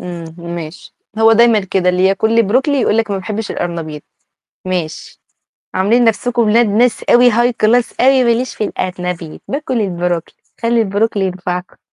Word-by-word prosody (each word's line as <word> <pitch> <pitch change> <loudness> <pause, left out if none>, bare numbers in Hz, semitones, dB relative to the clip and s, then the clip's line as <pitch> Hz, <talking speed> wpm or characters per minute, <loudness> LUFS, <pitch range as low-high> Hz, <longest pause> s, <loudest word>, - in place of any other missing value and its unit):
امم، 170 -2 -8 0.2
ماشي، 165 0 -9 0.2
هو 225 0 +5
دايمًا 230 -1 +4
كده 190 -1 -1
اللي 180 +1 +2
ياكل 200 +4 +2
لي 230 - +5
بروكلي 260 +7 +1
يقول 220 - +1
لِك 225 -2 0
ما 200 - -1
باحبش 210 +3 -5
الأرنبيط، 160 -4 -5 0.6
ماشي، 175 -4 -5 0.5
عاملين 225 +6 +2
نفْسكم 235 +2 +1
ولاد 230 +2 +3
ناس 220 +3 +1
أوي 245 +1 +6
High 240 +2 +2
Class 235 +2 +2
أوي، 260 0 +4
ما 235 - +3
ليش 245 +3 -1
في - - -3
القرنبيط، 180 -4 -5
باكل 275 -3 -2
البروكلي 175 -4 -2 0.3
خلّي 230 0 +2
البروكلي 205 0 0
ينفعكم. 180 0 -5
210 Hz, 160 wpm, -16 LUFS, 180-235 Hz, 0.6 s, أوي